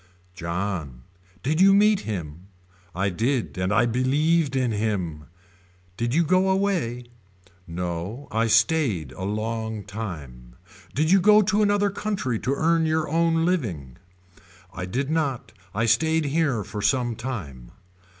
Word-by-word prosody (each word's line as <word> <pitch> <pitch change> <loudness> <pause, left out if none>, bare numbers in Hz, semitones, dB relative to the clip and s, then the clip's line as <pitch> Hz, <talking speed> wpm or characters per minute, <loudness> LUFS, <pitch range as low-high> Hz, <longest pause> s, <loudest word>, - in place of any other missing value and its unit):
John. 85 -7 -4 0.4
Did 155 +6 +1
you 195 +1 +7
meet 210 0 +4
him. 85 - -6 0.5
I 100 +2 +1
did 115 +7 -1
and 90 +1 0
I 115 +3 +4
believed 140 +5 +1
in 130 -3 +1
him. 95 -8 -2 0.7
Did 120 +4 -2
you 170 - +4
go 185 +4 +2
away. 185 -12 0 0.6
No 90 +9 -5
I 115 +1 +1
stayed 110 - +2
a 90 - -8
long 110 +1 -3
time. 75 - -8 0.4
Did 155 +4 +2
you 195 0 +6
go 210 +2 +6
to 210 +1 +1
another 205 -1 +2
country 195 - -2
to 135 +2 -1
earn 165 +1 +2
your 155 0 0
own 165 +1 +2
living. 95 - -2 0.8
I 90 +1 -5
did 135 +9 -2
not 140 -9 -1 0.2
I 115 +2 +1
stayed 160 +8 +2
here 140 -6 0
for 105 - -6
some 120 +3 +1
time. 80 - -6
120 Hz, 140 wpm, -24 LUFS, 95-160 Hz, 0.8 s, you